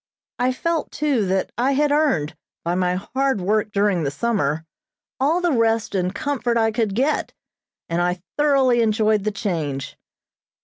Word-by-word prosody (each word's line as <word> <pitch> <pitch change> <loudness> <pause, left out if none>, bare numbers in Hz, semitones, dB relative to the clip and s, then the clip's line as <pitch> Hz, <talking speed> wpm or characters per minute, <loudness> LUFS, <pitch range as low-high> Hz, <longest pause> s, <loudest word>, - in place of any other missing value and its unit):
I 250 +1 +2
felt, 330 +5 -1
too, 275 -9 0
that 190 +1 0
I 265 +3 +2
had 290 +1 +2
earned, 270 - +1 0.3
by 170 - 0
my 180 0 +1
hard 265 +5 -1
work 210 +3 0
during 200 -3 +1
the 145 - 0
summer, 160 -3 -1 0.5
all 310 +7 +2
the 350 -1 +2
rest 230 -3 +1
and 185 -2 0
comfort 240 +2 -1
I 225 -1 +2
could 215 -3 -1
get, 275 +6 0 0.5
and 170 +1 0
I 180 +1 0 0.2
thoroughly 270 -5 +3
enjoyed 215 -2 +2
the 215 - +1
change. 160 -10 -3
220 Hz, 160 wpm, -22 LUFS, 185-265 Hz, 0.5 s, thoroughly